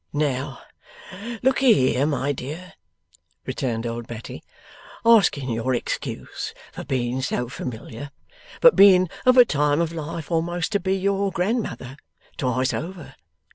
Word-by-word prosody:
'Now, 140 -2 -1 0.9
lookee 265 -2 +5 0.2
here, 130 +5 +1
by 145 -1 0
dear,' 150 +7 -7 0.7
returned 120 -3 -3
old 115 0 -4
Betty 115 -1 -8 0.6
'asking 170 - +4
your 115 +3 0
excuse - - -5 0.2
for - - -7
being 125 0 -2
so 125 -2 -2
familiar, 120 +1 -7 0.5
but - - +7
being 185 -3 +6 0.2
of 255 0 +6
a 250 - +9
time 145 -4 +1
of 170 -1 0
life 165 0 -6
a'most 170 +1 -1
to 205 - +1
be 190 +1 0
your 200 +1 0
grandmother 180 - -2 0.4
twice 130 0 0
over. 165 -5 -6
150 Hz, 130 wpm, -23 LUFS, 130-185 Hz, 0.9 s, a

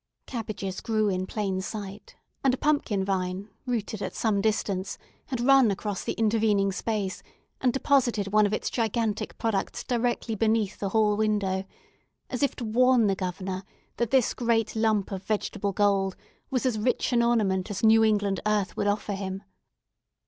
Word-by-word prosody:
Cabbages 210 -6 -5
grew 215 -2 +1
in 185 -1 -1
plain 195 -3 -2
sight; 200 0 -7 0.3
and 265 -2 +3
a - - -13
pumpkin 255 -11 +1
vine, 190 +1 -2 0.2
rooted 220 -4 -2
at - - -4
some 210 -3 +1
distance, 200 -3 -1 0.3
had 260 -5 -3
run 265 -1 +5
across 200 0 -3
the - - -2
intervening 215 -3 +2
space, 200 -1 -2 0.4
and 255 - +3
deposited 245 -6 +2
one 215 -1 +5
of - - -4
its 215 - -2
gigantic 225 -2 -1
products 215 -4 -1
directly 240 -1 -1
beneath 220 -1 +1
the 200 - -1
hall 210 0 +3
window, 205 -3 0 0.7
as 250 - -3
if 280 - +1
to 240 - -5
warn 245 +1 +4
the 200 - +3
Governor 185 0 -4 0.3
that 235 -2 0
this 260 -2 +3
great 230 -2 0
lump 220 -3 +1
of 190 -1 -4
vegetable 205 -1 -1
gold 195 -1 +2 0.3
was 260 -2 -1
as 240 -4 +1
rich 250 +3 0
an 235 - +4
ornament 215 -5 +1
as 205 0 -4
New 225 0 +6
England 205 -3 +2
earth 210 -2 0
would 205 - -1
offer 205 0 0
him. 195 0 -4
215 Hz, 165 wpm, -27 LUFS, 195-230 Hz, 0.7 s, New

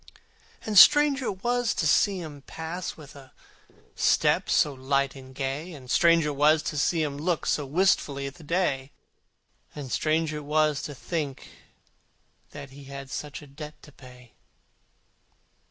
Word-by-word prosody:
For 215 - -4
strange 290 +6 +7
it 195 -6 -4
was 245 -2 0
to 170 - -1
see 190 +5 +3
him 150 -4 -9
pass 160 +5 -6
With 145 -3 -13
a 135 -2 -15 0.6
step - - +2
so 145 - +3
light 135 +1 -1
and 130 -1 -13
gay, 140 +6 -4
And 130 -4 -9
strange 170 -2 +4
it 150 -1 -2
was 150 +2 +4
to 150 - -4
see 165 +2 +1
him 145 -2 -3
look 170 +1 -1
So 145 -2 0
wistfully 145 -4 +1
at 140 - -6
the 165 - -15
day, 145 -5 -1 0.8
And 140 -4 -7
strange 155 0 0
it 150 -1 -5
was 150 0 +1
to 145 - -8
think 145 -1 -4 1.0
that 140 -2 -10
he 140 +1 -13
Had 140 -1 -9
such 150 0 -6
a - - -11
debt 150 +2 -10
to 150 - -14
pay. 125 -3 -16
150 Hz, 160 wpm, -26 LUFS, 140-165 Hz, 1.0 s, strange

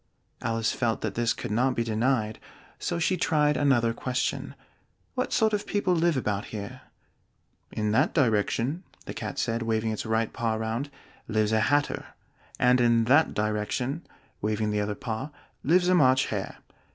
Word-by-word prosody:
Alice 115 -1 0
felt 115 -3 -1
that - - -2
this 120 0 +1
could - - -4
not 125 +4 +2
be 115 - +1
denied, 110 -1 0 0.4
so - - -2
she 180 +2 +1
tried 150 -3 +2
another 120 -6 +3
question. 125 +2 -2 0.6
"What 255 -1 -2
sort 220 -2 +2
of 205 - -1
people 205 -3 +1
live 170 -3 +2
about 105 -5 -1
here?" 110 +4 -7 0.9
"In 105 -1 -1
that 135 +8 +3
direction," 125 - +1 0.2
the - - -6
Cat - - -5
said, 115 +1 -1
waving 110 -1 0
its 110 - -3
right 110 0 0
paw 115 -1 -1
round, 110 +5 -2 0.4
"lives 110 -1 +1
a 110 - +3
Hatter; 145 +6 0 0.4
and 125 0 +4
in 115 -1 +4
that 145 +7 +4
direction," 110 +8 -1 0.4
waving 105 0 0
the 105 0 0
other 105 0 -2
paw, 115 +6 -4 0.3
"lives 175 +5 +3
a 185 - +4
March 130 -6 +5
Hare. - - -4
115 Hz, 165 wpm, -27 LUFS, 110-145 Hz, 0.9 s, March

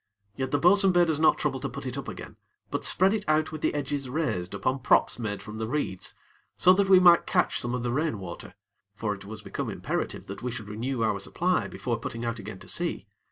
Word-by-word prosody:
Yet, 130 0 -2
the 145 - +2
bo'sun 190 +5 +5
bade 175 -2 +4
us 150 - -1
not 160 - +5
trouble 135 -3 -1
to 140 +1 -3
put 135 +2 -7
it 130 -1 -4
up 140 - -5
again; - - -8 0.4
but - - -2
spread 190 +2 +3
it 215 -2 -1
out 155 0 +2
with 155 -1 -6
the - - 0
edges 140 -2 -3
raised 125 - -2
upon 130 +1 -1
props 125 - +3
made 105 -3 -4
from 105 +1 -8
the 110 - -2
reeds, 120 -8 -2 0.4
so 185 - +6
that 195 0 +2
we 190 -1 +8
might 175 -2 +6
catch 180 -3 +1
some 120 +1 -1
of 125 - -3
the 120 - -1
rainwater; 110 - -3 0.4
for 105 -1 -2
it 100 -1 -10
was 105 +1 -9
become - - -4
imperative - - -3
that 100 - -8
we 125 - -2
should 115 -4 -6
renew 115 +3 -2
our 105 -3 +1
supply 180 - 0
before 120 -3 -3
putting 115 +1 -5
out 115 0 -2
again 105 -1 -7
to - - -13
sea. - - -1
130 Hz, 235 wpm, -27 LUFS, 110-155 Hz, 0.4 s, we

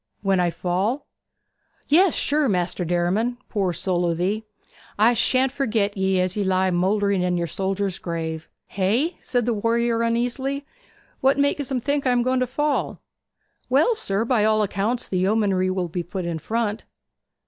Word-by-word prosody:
'When 195 -2 +2
I 175 -1 +2
fall?' 190 - -1 0.8
'Yes, 350 +3 +4
sure, 295 -2 +1
Maister 180 -1 0
Derriman. 180 +8 0
Poor 195 -4 0
soul 175 +1 -1
o' 170 - 0
thee! 195 +6 -1 0.5
I 220 +4 +5
shan't 255 +3 +2
forget 220 -7 0
'ee 190 -1 +1
as 185 0 0
you 205 - 0
lie 190 0 +1
mouldering 195 +2 +1
in 180 0 0
yer 170 - 0
soldier's 195 +2 -2
grave.' 160 -2 -4 0.2
'Hey?' 230 - 0
said 245 -3 -1
the 240 - +1
warrior 230 +2 +1
uneasily. 245 +4 -1 0.5
'What 270 +1 +3
makes 285 -1 +1
'em 260 -3 -1
think 285 +1 0
I - - +4
am 245 -1 +2
going 255 +1 +1
to 255 - 0
fall?' 295 +3 -1 0.7
'Well, 290 - +4
sir, 220 - -2
by 235 -3 +2
all 215 0 +3
accounts 210 +5 -1
the 185 - -1
yeomanry 190 -1 +2
will 185 -1 -1
be 175 +2 -3
put 180 +1 -5
in 170 -2 -3
front.' 220 +4 -2
210 Hz, 170 wpm, -23 LUFS, 185-245 Hz, 0.8 s, I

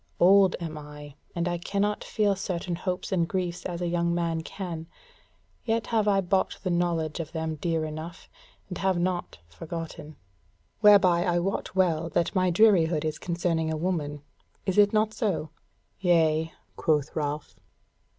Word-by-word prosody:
Old 190 +1 +6
am 160 -3 -5
I, 150 -1 -10 0.2
and 170 0 -1
I 175 0 -1
cannot 200 +4 -1
feel 205 -2 +1
certain 180 -2 -3
hopes 180 +2 -3
and 170 -3 +1
griefs 180 -2 -3
as 175 -1 -5
a - - 0
young 170 0 0
man 165 -1 -1
can; 165 -2 -6 0.8
yet 230 0 0
have 215 -2 +2
I 195 -1 +4
bought 190 +1 0
the 185 - 0
knowledge 170 -3 0
of 160 0 -5
them 160 -1 -2
dear 165 0 -1
enough, 155 +2 -7 0.4
and 180 - -6
have 190 -1 +1
not 175 0 -2
forgotten. 155 - -7 0.6
Whereby 195 -5 +6
I 175 -2 +1
wot 190 +2 -2
well 165 -3 +2
that 170 - +1
my 185 -2 +2
drearihead 170 -5 +4
is 155 -1 -2
concerning 170 -2 -1
a 160 - -1
woman. 150 -4 -2 0.4
Is 190 +1 +1
it 205 0 +6
not 215 0 +2
so?" 190 - -1 0.5
"Yea," 160 -3 +2 0.3
quoth 150 -3 +1
Ralph. 150 -1 -3
175 Hz, 160 wpm, -27 LUFS, 160-190 Hz, 0.8 s, Old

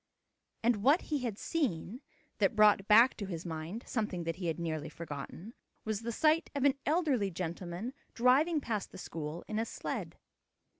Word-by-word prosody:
And 235 -1 +3
what 275 - +4
he 295 - +2
had 235 -6 -3
seen, 240 - -2 0.4
that 245 - +3
brought 210 -2 +5
back 230 +4 +7
to 200 - -4
his 170 -2 -5
mind 165 +7 -5
something 210 -7 -2
that 165 +1 -3
he 180 -2 -3
had 165 +1 -1
nearly 155 -3 -3
forgotten, 165 +6 -7 0.3
was 215 -1 -2
the 235 +1 -3
sight 315 +7 +3
of 280 - 0
an 280 -1 +5
elderly 290 - +2
gentleman 175 +5 -4 0.2
driving 280 +7 +4
past 215 -6 -3
the - - -10
school 160 -2 -6
in 215 0 -2
a 225 - 0
sled. - - -5
210 Hz, 170 wpm, -32 LUFS, 170-250 Hz, 0.4 s, back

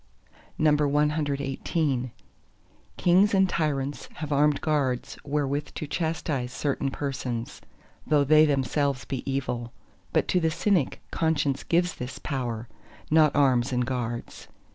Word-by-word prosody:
CXIX 145 -2 +1 0.9
Kings 185 +4 +4
and 190 0 +4
tyrants 145 -5 -2
have 155 -1 -6
armed 145 0 +3
guards 140 -5 -1
wherewith 145 0 -2
to - - -4
chastise 150 -4 -2
certain 140 0 -1
persons, 130 -4 -4 0.5
though 150 -2 +4
they 155 +2 +6
themselves 140 -1 0
be 135 - -3
evil. 125 -3 -3 0.4
But - - +1
to 180 - +3
the 165 -2 +2
Cynic 170 -2 0
conscience 150 -4 0
gives 175 +1 +1
this 125 +1 -6
power—not 135 +4 -1
arms 130 -3 +3
and 125 -1 +1
guards. 120 -2 -4
145 Hz, 115 wpm, -26 LUFS, 130-155 Hz, 0.9 s, they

